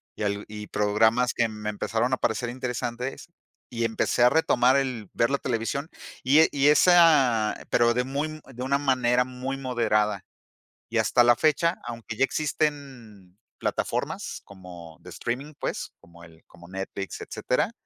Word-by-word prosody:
y - - -5
al 100 0 -2
y 105 0 -8
programas 110 +4 +2
que 115 - +2
me 105 -1 -5
empezaron 110 +3 -1
a - - +2
parecer 120 +2 -1
interesantes, 125 0 -4 0.4
y 115 -1 -3
empecé 115 +1 +1
a 125 - +7
retomar 130 -3 +3
el 125 -7 -3
ver 115 - +2
la 140 - +1
televisión 125 +5 -2 0.3
y 140 +5 +5
e 160 - +6
y 140 0 +2
esa, 150 -9 +5 0.2
pero 120 0 +3
de 125 +1 0
muy, 150 +4 -3
de 125 - -6
una 140 +2 +1
manera 125 -3 +2
muy 130 +1 -5
moderada. 105 -6 0 0.7
Y 115 - -2
hasta 110 +2 +4
la 120 0 +5
fecha, 160 +4 +2
aunque 115 -2 -7
ya - - +2
existen 135 -12 -4 0.2
plataformas - - -3
como 90 -4 -12
de - - -12
streaming, 135 +6 -4
pues, - - -4
como 85 0 -17
el 80 -1 -17
como 85 0 -16
Netflix, 95 +1 -6
etcétera, - - -1
120 Hz, 160 wpm, -26 LUFS, 105-135 Hz, 0.7 s, a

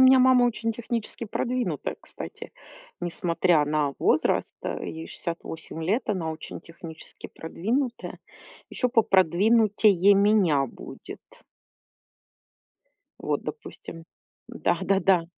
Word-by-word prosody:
меня 260 0 +8
мама 255 -1 +6
очень 230 -1 0
технически 235 +1 -4
продвинутая, 250 +4 -2
кстати. - - -9 0.5
Несмотря 170 -2 +1
на 150 -1 0
возраст, - - +2
а - - -4
ей 160 0 -6
68 165 -1 -6
лет, 205 +10 +1
она 180 -6 -1
очень 155 - -8
технически 165 -1 -11
продвинутая. 235 - -3 0.5
Ещё 250 - -1
попродвинутее 205 -1 +4
меня 195 -9 +3
будет. - - -10 2.0
Вот, - - -2
допустим 165 -1 -8 0.4
Да-да-да. 190 -3 +1
195 Hz, 95 wpm, -26 LUFS, 165-230 Hz, 2.0 s, меня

